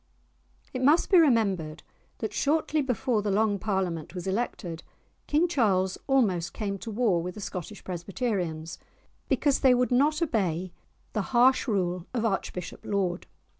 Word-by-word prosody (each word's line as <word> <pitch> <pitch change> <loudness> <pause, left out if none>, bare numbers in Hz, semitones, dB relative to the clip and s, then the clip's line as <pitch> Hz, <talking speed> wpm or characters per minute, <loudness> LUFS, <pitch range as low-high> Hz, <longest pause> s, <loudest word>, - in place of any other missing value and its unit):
It 255 - -3
must 300 +9 +4
be 370 - +8
remembered 200 - +2 0.3
that 220 - -4
shortly 310 +1 +1
before 250 -3 0
the 205 - -2
Long 205 0 +2
Parliament 185 -5 -2
was 180 - -5
elected, 190 -5 -3 0.5
King 310 +4 +3
Charles 195 - +1
almost 205 -11 +2
came 200 -2 -3
to 230 - -7
war 210 -6 +1
with 180 +1 -5
the - - -8
Scottish 190 0 -6
Presbyterians, 175 -3 -3 0.5
because 285 -2 +2
they 260 -2 +5
would 250 +1 +1
not 290 +5 +3
obey 185 - -1 0.4
the 215 - 0 0.2
harsh 260 +3 +5
rule 180 -5 -1
of 230 -1 0
Archbishop 190 -4 -3
Laud. 190 -3 -1
205 Hz, 145 wpm, -27 LUFS, 180-255 Hz, 0.5 s, be